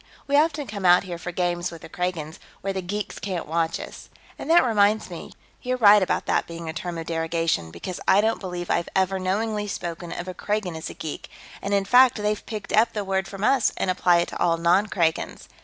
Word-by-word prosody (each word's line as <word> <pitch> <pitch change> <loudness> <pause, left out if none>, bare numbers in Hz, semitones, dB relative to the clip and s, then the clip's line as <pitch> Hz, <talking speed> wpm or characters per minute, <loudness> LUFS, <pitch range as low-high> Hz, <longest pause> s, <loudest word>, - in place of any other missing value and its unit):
We 280 - 0
often 300 -1 +2
come 205 -4 -6
out 180 0 +6
here 175 -3 -6
for 175 - -5
games 175 0 -1
with 165 -2 -11
the - - -8
Kragans, 165 -2 -4 0.2
where 195 0 -2
the 190 - -3
geeks 200 +3 -4
can't 185 -4 -3
watch 165 +1 -1
us. - - -9 0.3
And - - -6
that 335 -4 +6
reminds 215 -2 +2
me - - -8 0.3
you're 255 0 -1
right 210 -3 +7
about 185 - 0
that - - +1
being 170 0 -7
a 160 - -4
term 170 +1 -5
of 165 - -5
derogation, 165 - -1
because 180 - -7
I 190 - +6
don't 220 +2 +1
believe 180 -2 -5
I've 170 - 0
ever 190 0 +1
knowingly 210 +3 -1
spoken 170 -3 -5
of 175 +1 -5
a 185 - -4
Kragan 205 -2 -2
as 160 - -5
a - - -9
geek, 155 -2 -6 0.3
and 200 - -4
in 200 -1 +2
fact 250 +3 +6
they've 210 -1 -1
picked 215 -2 -6
up 225 +2 +4
the 210 - -2
word 190 -1 -1
from 195 +2 -7
us 260 +2 +3
and 185 - +1
apply 175 -1 +3
it 170 - -3
to - - -7
all 170 -1 +3
non 175 +5 +3
Kragans. 165 -5 -1
185 Hz, 230 wpm, -24 LUFS, 170-210 Hz, 0.3 s, right